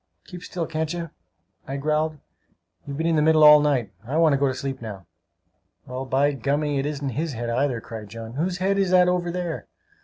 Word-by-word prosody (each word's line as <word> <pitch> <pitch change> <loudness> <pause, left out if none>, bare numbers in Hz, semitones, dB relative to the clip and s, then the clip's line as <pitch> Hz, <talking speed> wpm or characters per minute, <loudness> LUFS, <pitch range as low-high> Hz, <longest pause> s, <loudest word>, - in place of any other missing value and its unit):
"Keep 180 -2 -10
still, 175 -2 -4
can't 160 -1 -2
you?" 170 -3 -5 0.6
I 135 - -3
growled. 155 +2 0 0.7
"You've 140 -1 -5
been 160 - -1
in 165 -1 +2
the - - +3
middle 155 0 +5
all 150 0 +10
night! 135 -8 +1
I 135 +7 -3
want 165 -3 +5
to - - +3
go 140 - +3
to 130 - 0
sleep 135 -1 -4
now." 100 -5 -8 0.8
"Well, 130 +1 -5
by 135 +2 +2
gummy, 140 +2 0
it 135 - -1
isn't 145 -2 -3
his 150 +5 -3
head 120 0 -3
either!" 125 0 0
cried 110 -2 -9
John. 115 +1 -8
"Whose 175 +6 -1
head 195 +2 +1
is 195 -2 +2
that 180 -1 +5
over 180 -1 0
there?" 175 -1 -4
150 Hz, 215 wpm, -24 LUFS, 130-165 Hz, 0.8 s, all